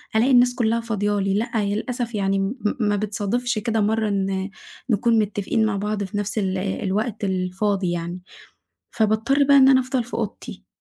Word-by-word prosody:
ألاقي 235 +5 +3
الناس 245 -1 +5
كلها 230 -2 +1
فاضية 205 -3 -1
لي. 195 0 0
لأ، 215 +4 -1
للأسف 235 +3 -3
يعني 195 -1 0
م 195 +5 -1 0.2
ما 205 -3 +1
بتصادفش 215 +3 -1
كده 220 +1 0
مرّة 220 +1 +1
إن 195 -1 -1 0.4
نكون 230 +1 +3
متفقين 210 +1 0
مع 210 -2 0
بعض 210 +1 -2
في 195 +1 -5
نفس 205 +1 -3
ال 190 -2 0
الوقت 200 +3 -2
الفاضي 190 0 -1
يعني. 175 +1 -4 0.7
فباضطر 220 +6 +2
بقى 280 0 +5
إن 265 -1 +7
أنا 265 -1 +6
أفضل 255 -1 -1
في 240 - -9
أوضتي. - - -5
210 Hz, 170 wpm, -22 LUFS, 195-230 Hz, 0.7 s, إن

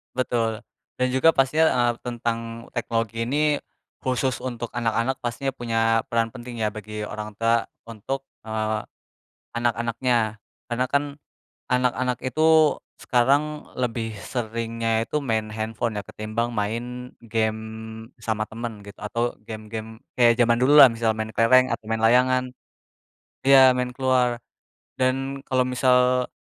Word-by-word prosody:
Betul. 115 -3 0 0.3
Dan 125 0 0
juga 130 +6 +4
pastinya, 145 +4 +3
eee, 120 -1 +2
tentang 120 -1 -2 0.3
teknologi 115 -1 -2
ini, 150 +3 +2 0.5
khusus 130 0 0
untuk 120 -2 -4
anak-anak, 115 +2 0
pastinya 120 +3 -2
punya 115 -3 0
peran 115 -1 0
penting 120 -1 -8
ya 110 - +2
bagi 105 0 -7
orang 105 0 -6
tua 115 +1 +2 0.2
untuk, 115 +5 -4 0.2
eee, 110 -1 -2 0.7
anak-anaknya, 120 -1 0 0.3
karena 125 +2 0
kan 140 +1 +2 0.7
anak-anak 125 0 +1
itu 155 +3 +4 0.2
sekarang 145 +5 +1
lebih 115 -3 -2
seringnya 115 -1 -2
itu 150 - -1
main 110 -4 -1
handphone 110 0 -3
ya, - - -7
ketimbang 110 +3 -3
main 120 +4 -3
game 110 -1 -1 0.6
sama 110 -1 -1
temen 115 -2 -6
gitu, 100 - -12
atau 115 +3 -1
game-game 110 +1 -7 0.2
kayak 120 -2 +5
jaman 120 -1 +4
dulu 145 +4 +5
lah, - - +11
misal 115 -1 0
main 110 0 -3
kelereng 130 +2 +5
atau - - -6
main 110 0 -1
layangan, 125 +2 +4 1.0
ya 135 -1 +8
main 125 0 -1
keluar. 125 -2 +1 0.6
Dan 135 +1 0
kalau 130 -2 +2
misal 125 0 +3
120 Hz, 130 wpm, -24 LUFS, 110-130 Hz, 1.0 s, lah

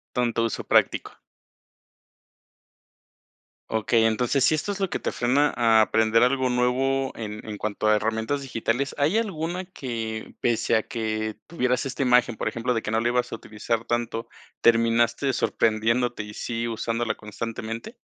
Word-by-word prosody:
Tanto 120 -2 +1
uso 115 - -2
práctico. - - +2 2.6
Okey, 110 +1 +2
entonces, 120 +4 +2
si 145 - +4
esto 155 +6 -1
es 200 - -7
lo 195 - +1
que - - -2
te - - -2
frena 140 +4 +2
a 115 -2 +4
aprender 110 +1 +3
algo 130 0 +2
nuevo 130 +2 +1
en 105 -1 -6
en 105 - -5
cuanto 105 +1 -2
a 110 - +5
herramientas 110 +6 -1
digitales, 130 +1 -2
¿hay 150 +9 +2
alguna 180 -4 -2
que, 115 -10 -5
pese 120 -2 +1
a 110 - +2
que 110 -2 -3
tuvieras 130 -7 0
esta 135 +1 -4
imagen, 125 -2 +3
por - - -2
ejemplo, 120 +2 -1
de 115 - -1
que 105 - -4
no 110 - +2
la 120 - 0
ibas 125 0 0
a - - -3
utilizar 110 +1 -3
tanto, 120 -1 -2 0.3
terminaste 115 +3 +3
sorprendiéndote 115 0 +1
y 105 0 -9
sí 115 +2 -3
usándola 115 0 -2
constantemente? 115 - -6
115 Hz, 155 wpm, -25 LUFS, 110-130 Hz, 2.6 s, a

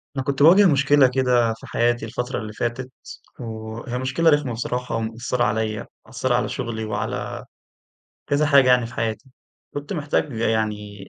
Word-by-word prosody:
أنا 135 - -2
كنت 140 +1 0
باواجه 185 +6 +7
مشكلة 140 -2 +4
كده 125 -3 +2
في 110 - -13
حياتي 120 -1 0
الفترة 125 +3 -4
اللي 105 0 -7
فاتت، 120 +3 -3 0.5
وهي 115 +1 -6
مشكلة 130 +6 +2
رخمة 145 -5 +2
بصراحة 125 +1 -3
ومأثرة 115 +2 -2
عليَّ، 110 -2 -1 0.2
مأثرة - - -1
على - - 0
شغلي 110 -1 -4
وعلى 105 -1 -4 0.8
كذا 145 +2 +2
حاجة 140 -3 +5
يعني 125 -2 +4
في 120 - -11
حياتي، 115 +3 -3 0.4
كنت 145 +5 -5
محتاج 150 -3 -1
يعني 105 -3 -2
120 Hz, 150 wpm, -22 LUFS, 110-135 Hz, 0.8 s, باواجه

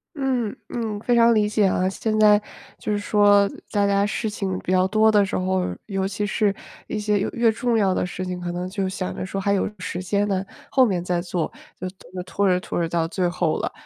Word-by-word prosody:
嗯 255 -6 -1
嗯， 220 -3 -3
非 240 +2 +1
常 235 0 +6
理 210 -1 +2
解 210 -1 +2
啊。 185 0 +2
现 215 +2 -2
在 210 -1 +6 0.4
就 - - -4
是 205 - 0
说 205 -1 +4 0.2
大 200 -1 +2
家 200 0 +2
事 220 +1 -2
情 190 -3 -3
比 185 - -4
较 185 0 +3
多 215 +2 +4
的 205 -2 +4
时 195 - -4
候， 185 - 0
尤 195 -1 -1
其 205 +1 -3
是 205 0 +1 0.3
一 - - -3
些 210 0 +1
越 195 - 0
越 235 -1 +2
重 235 +1 0
要 195 -4 +3
的 - - 0
事 185 +1 -5
情， 180 -1 -4
可 175 0 -4
能 180 +1 -4
就 195 -1 -2
想 185 -1 -4
着 - - -4
说 195 +1 -4
还 200 0 +1
有 195 - +1
时 180 0 -4
间 205 +2 0
呢， 195 -1 -1 0.2
后 260 -2 +5
面 180 -5 -1
再 180 -1 0
做， 175 -1 -2 0.3
就 185 - -3 0.4
拖 195 +3 0
着 180 -1 +3
拖 180 - -4
着 165 - +1
到 165 -1 0
最 180 +1 0
后 175 -2 0
了。 - - -2
200 Hz, 250 characters per minute, -23 LUFS, 185-210 Hz, 0.4 s, 常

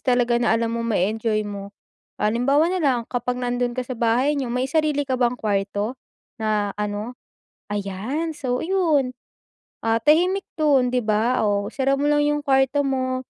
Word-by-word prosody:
talaga 245 -2 +2
na 225 -1 +3
alam 230 0 -1
mong 230 0 -2
ma-e-enjoy 215 +3 0
mo. 200 -1 -6 0.5
Halimbawa 275 +10 +2
na 370 - -1
lang 265 -6 +2
kapag 245 0 -1
nandun 245 0 -1
ka 255 - -2
sa 255 - -6
bahay 240 +5 +2
niyo, 255 - -3
may 250 +2 -1
sarili 300 -1 +1
ka 260 -2 -2
bang 245 0 +2
kuwarto, 205 +3 -2 0.4
na 210 -2 0
ano? 210 +3 -3 0.6
Ayan. 205 - -3
So, 255 -5 -2
yun, 320 -8 +1 0.7
ah, 225 0 +2
tahimik 360 +6 +3 0.2
dun, 275 -5 +3
'di 250 - +2
ba? 220 +4 +1
Oh, 200 -1 0
isara 270 0 +1
mo 290 - +1
lang 295 0 +3
yung 295 0 0
kuwarto 270 +1 +3
mo, 260 -1 -1
250 Hz, 165 wpm, -23 LUFS, 220-280 Hz, 0.7 s, na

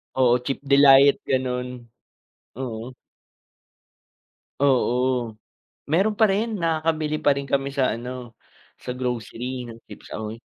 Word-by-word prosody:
Oo, 125 -2 +4
chip 135 - -2
delight 140 0 +7
gano'n. 125 -1 -1 0.9
Oo. 120 -1 -5 1.6
Oo. 125 -3 +1 0.5
Meron 195 +7 +2
pa 220 - +7
rin. 220 +4 0
Nakakabili 160 -2 0
pa 145 - +5
rin 140 0 -5
kami 140 0 0
sa 135 -4 +1
ano, 125 -1 -8 0.5
sa 125 - -4
grocery 125 0 -4
ng 115 -1 -10
chips - - -13
ahoy. 110 +1 -6
130 Hz, 115 wpm, -23 LUFS, 125-140 Hz, 1.6 s, delight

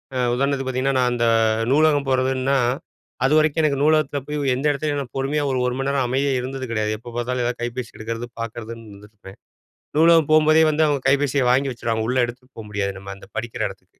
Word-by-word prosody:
அ - - -1 0.2
உதாரணத்துக்கு 135 +1 0
பாத்தீங்கன்னா, 130 +1 0
நான் 125 -1 +2
அந்த 120 -1 0 0.5
நூலகம் 145 -1 +3
போறதுன்னா 130 +1 +1 0.7
அதுவரைக்கும் 155 +2 +3
எனக்கு 140 -3 +1
நூலகத்துல 155 -2 +2
போய் 150 0 -3 0.2
எந்த 135 +4 -4
இடத்துலயும் 145 0 -2
நான் 120 -4 -9
பொறுமையா 140 +3 0
ஓர் 130 - 0
1 125 - -2
மணி 135 - -1
நேரம் 140 -2 +1
அமைதியா 135 +2 0
இருந்தது 130 +1 -5
கிடையாது. 110 -1 -1
எப்ப 120 +2 -11
பாத்தாலும் 125 +1 -1
ஏதா 120 - +1
கைபேசி 120 0 -4
எடுக்கிறது 115 +2 -5
பாக்கறதுன்னு 115 0 -7
இருந்துருப்பேன், 100 -1 -14 0.6
நூலகம் 165 -2 +5
போம்போதே 155 +1 +5
வந்து 155 +1 +2
அவங்க 145 -2 0
கைபேசிய 140 -1 +2
வாங்கி 135 +1 +1
வச்சுருவாங்க 115 -2 -2
உள்ள 130 +1 0
எடுத்துகட்டு 125 +2 -12
போக 110 - -8
முடியாது 100 -1 -2
நம்ம 100 0 -8
அந்த 100 - -15
படிக்கிற 115 +1 -3
எடத்துக்கு. - - -14
130 Hz, 190 wpm, -22 LUFS, 120-145 Hz, 0.7 s, நூலகம்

